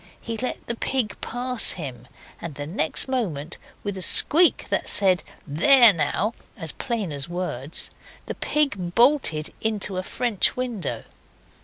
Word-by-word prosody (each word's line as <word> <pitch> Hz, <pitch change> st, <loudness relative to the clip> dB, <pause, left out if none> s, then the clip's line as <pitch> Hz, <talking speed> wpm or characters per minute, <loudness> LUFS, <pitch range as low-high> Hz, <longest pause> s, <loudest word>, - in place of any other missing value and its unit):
He 230 Hz, -, -6 dB
let 250 Hz, +3 st, -5 dB
the 235 Hz, -, -2 dB
pig 235 Hz, -2 st, -2 dB
pass 250 Hz, 0 st, +1 dB
him, 125 Hz, -8 st, -8 dB, 0.3 s
and 165 Hz, -4 st, -7 dB
the 145 Hz, -, -6 dB
next 160 Hz, -, -1 dB
moment, 175 Hz, -, -3 dB, 0.2 s
with 205 Hz, -1 st, -3 dB
a 190 Hz, -, -6 dB
squeak 330 Hz, -, +4 dB
that -, -, -1 dB
said 190 Hz, -3 st, +5 dB, 0.2 s
'There 220 Hz, -, +7 dB
now!' 175 Hz, +7 st, -1 dB, 0.2 s
as 165 Hz, -6 st, -3 dB
plain 230 Hz, -, -4 dB
as 140 Hz, +1 st, -5 dB
words, 165 Hz, -5 st, -4 dB, 0.3 s
the -, -, -5 dB
pig 205 Hz, -13 st, -1 dB
bolted 235 Hz, -, +2 dB
into 210 Hz, -3 st, -1 dB
a -, -, -1 dB
French 230 Hz, +2 st, -1 dB
window. 220 Hz, -, -4 dB
195 Hz, 145 wpm, -23 LUFS, 160-245 Hz, 0.3 s, There